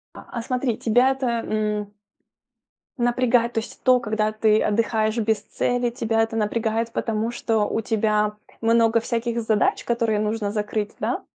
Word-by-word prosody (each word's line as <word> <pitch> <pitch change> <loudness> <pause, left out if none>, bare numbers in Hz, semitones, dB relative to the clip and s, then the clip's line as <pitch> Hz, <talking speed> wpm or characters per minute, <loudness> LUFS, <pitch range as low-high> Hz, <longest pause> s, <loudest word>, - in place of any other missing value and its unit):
А, - - -10
а 235 - -4
смотри, 250 -1 -1
тебя 245 +3 +3
это, 265 -1 -3 0.2
м, 210 -1 -2 1.0
напрягает, 240 -1 +2
то 225 - +1
есть 225 - -11
то, 255 -1 +5
когда 215 -1 -1
ты 215 0 +3
отдыхаешь 220 +1 +1
без 220 -1 +1
цели, 245 -1 -1
тебя 225 -2 0
это 225 0 -2
напрягает, 225 +1 -1
потому 225 0 -1
что 225 -3 0
у - - -1
тебя 210 -1 0 0.2
много 230 0 +3
всяких 235 +1 -2
задач, 220 -2 +1
которые 230 -3 0
нужно 210 0 -1
закрыть, 210 0 -2
да? - - -2
225 Hz, 155 wpm, -23 LUFS, 215-235 Hz, 1.0 s, то